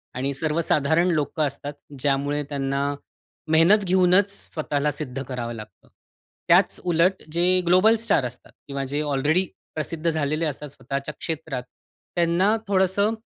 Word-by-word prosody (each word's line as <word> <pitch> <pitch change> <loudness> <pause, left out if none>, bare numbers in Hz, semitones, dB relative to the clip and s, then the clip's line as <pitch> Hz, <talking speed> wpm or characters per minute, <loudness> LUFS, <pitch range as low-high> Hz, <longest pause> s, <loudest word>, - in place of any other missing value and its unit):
आणि 135 +2 -1
सर्वसाधारण 155 +2 +1
लोकं 155 0 0
असतात, 145 +2 -6 0.3
ज्यामुळे 145 +1 0
त्यांना 140 -1 -1 0.7
मेहनत 175 +6 +5
घेऊनच 185 +2 +4
स्वतःला 150 -6 -2
सिद्ध 135 -2 -5
करावं 120 -2 -5
लागतं. 105 -4 -11 0.6
त्याच - - +4
उलट 180 +2 +2
जे 180 +2 +3
ग्लोबल 185 +6 +5
स्टार 160 - +2
असतात 125 +1 -9 0.2
किंवा 140 -1 -3
जे 145 +1 0
अलरेडी 155 +7 +2 0.3
प्रसिद्ध 160 +1 -2
झालेले 155 +1 0
असतात 150 0 -4
स्वतःच्या 140 +1 -5
क्षेत्रात, 160 -5 -4 0.5
त्यांना 175 +5 +3
थोडंसं 195 +2 +2
155 Hz, 125 wpm, -24 LUFS, 140-180 Hz, 0.7 s, मेहनत